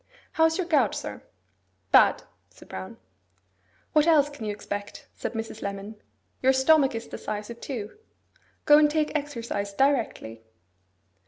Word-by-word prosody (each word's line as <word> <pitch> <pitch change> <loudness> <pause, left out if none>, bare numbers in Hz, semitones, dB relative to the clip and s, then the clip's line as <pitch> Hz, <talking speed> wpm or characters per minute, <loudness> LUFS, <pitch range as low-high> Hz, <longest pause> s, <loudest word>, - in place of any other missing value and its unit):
How 320 - +3
is 320 0 +2
your 370 - -1
gout, 285 - +2
sir?' - - -6 0.7
'Bad,' - - +5 0.3
said - - -17
Brown. 95 0 -8 1.0
'What 305 +1 +4
else 295 -3 +4
can 260 -6 -8
you 210 - -1
expect?' 205 0 -7
said - - -5
Mrs. 225 -1 -6
Lemon. 200 +2 -5 0.5
'Your 265 +1 +4
stomach 270 0 +4
is 225 +1 -5
the - - -8
size 210 +1 -5
of 235 - -11
two. 245 - -6 0.7
Go 295 0 +8
and 300 -1 +5
take 305 0 0
exercise 235 -8 -3
directly. 230 - 0
250 Hz, 150 wpm, -26 LUFS, 210-295 Hz, 1.0 s, Go